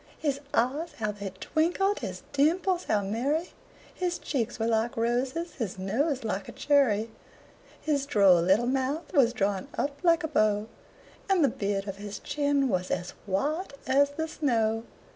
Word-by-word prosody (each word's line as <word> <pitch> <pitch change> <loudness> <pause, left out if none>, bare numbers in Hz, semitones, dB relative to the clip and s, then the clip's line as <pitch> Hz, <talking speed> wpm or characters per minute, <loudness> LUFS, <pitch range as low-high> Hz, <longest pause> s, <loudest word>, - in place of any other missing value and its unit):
His 280 -3 -1
eyes 280 +8 0
how 215 -2 -2
they 200 -1 -6
twinkled! 355 - +1
his - - -6
dimples 345 +6 +2
how 205 -1 +1
merry! 270 - -1 0.4
His 355 -1 -2
cheeks 240 -5 -2
were 225 - -1
like 230 +1 0
roses, 255 +9 -1
his 210 -7 -3
nose 260 - 0
like 200 -3 -3
a - - -6
cherry; 230 -7 +2 0.7
His 285 -3 -1
droll 195 -8 +5
little 190 +7 +3
mouth 270 +7 -1
was 265 -7 +5
drawn 200 -5 -1
up 285 0 -2
like 335 -3 +4
a - - 0
bow, 215 -7 +2 0.6
And 380 -4 +4
the 280 - +5
beard 200 -2 -2
on 195 - -3
his 205 0 -6
chin 285 -2 0
was 185 -5 -1
as 180 0 -2 0.2
white 295 - -1
as 280 +2 +4
the 320 +3 -3
snow. 225 -7 0
255 Hz, 160 wpm, -28 LUFS, 210-300 Hz, 0.7 s, droll